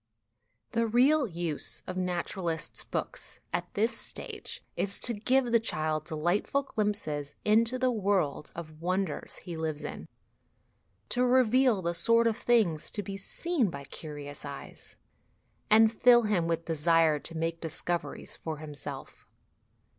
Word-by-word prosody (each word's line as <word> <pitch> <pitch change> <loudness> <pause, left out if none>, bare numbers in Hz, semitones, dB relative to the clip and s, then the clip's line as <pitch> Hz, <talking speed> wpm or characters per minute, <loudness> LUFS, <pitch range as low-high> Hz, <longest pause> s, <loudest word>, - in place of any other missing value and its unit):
The 230 -1 +1
real 260 +5 +4
use 170 -5 -3
of 185 - -5
naturalists' 175 -2 -2
books - - -5
at 175 0 -2
this 225 +4 +1
stage - - -5
is 200 0 -1
to 240 - +3
give 245 +3 +2
the 230 - +5
child 155 -7 0
delightful 175 - 0
glimpses 205 - -2
into 230 +4 +4
the 255 0 +2
world 195 -10 0
of 155 -2 -9
wonders 185 -1 -2
he 175 - -5
lives 160 -2 -3
in, - - -6 1.0
to 250 - +1
reveal 250 -3 +4
the 170 0 0
sort 230 +7 +3
of 230 -2 +2
things 215 -12 +2
to 205 - +1
be 195 +1 -5
seen 265 - -1
by 140 -3 -7
curious 145 0 -7
eyes, 140 -1 -9 0.7
and 220 +1 +7
fill 240 +1 +6
him 195 -6 +1
with 165 0 -1
desire 165 -1 +3
to 165 +3 -3
make 165 +1 -2
discoveries 170 +2 -3
for 160 -2 -5
himself. 150 -2 -9
185 Hz, 140 wpm, -29 LUFS, 160-230 Hz, 1.0 s, and